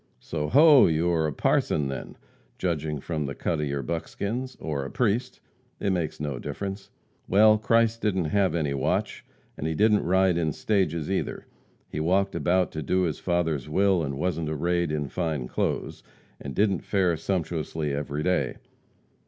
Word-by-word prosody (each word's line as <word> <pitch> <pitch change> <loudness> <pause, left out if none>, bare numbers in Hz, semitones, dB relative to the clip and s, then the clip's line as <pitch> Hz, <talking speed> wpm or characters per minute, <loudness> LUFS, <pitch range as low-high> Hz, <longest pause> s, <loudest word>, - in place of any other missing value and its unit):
"So, 75 -2 -3
ho! 145 +1 +7
You 85 +1 +1
are 80 -2 +1
a - - -2
parson 70 +1 +1
then, 70 -1 -6 0.4
judging 80 -4 -2
from 75 0 -3
the 70 - -5
cut 80 -3 -1
of 75 - -1
your 70 0 -2
buckskins 110 - -4
or 75 -3 -3
a 70 - -5
priest 125 - -1 0.4
it 100 - 0
makes 85 -4 -2
no 70 -4 -3
difference. 95 +6 -5 0.4
Well, 110 +2 +5
Christ 115 +1 +2
didn't 95 -5 0
have 95 -5 +2
any 75 -4 0
watch, 70 - -1 0.3
and 75 - -3
he 80 - -1
didn't 105 +3 +4
ride 95 0 +3
in 80 -3 0
stages 90 -5 0
either. 95 - -2 0.4
He - - -5
walked 95 +5 +1
about 90 0 +1
to 80 - -4
do 90 +6 +1
his 80 -4 -1
Father's 80 -6 -1
will, 95 +2 +3
and 70 -3 -3
wasn't 85 -1 -1
arrayed 85 +2 0
in 75 -2 -2
fine 80 -6 -2
clothes, - - -2 0.4
and 70 -2 -7
didn't 100 -4 +2
fare 95 -4 +1
sumptuously 80 -3 -2
every 75 +1 -3
day. 90 +1 0
85 Hz, 170 wpm, -26 LUFS, 75-95 Hz, 0.4 s, ho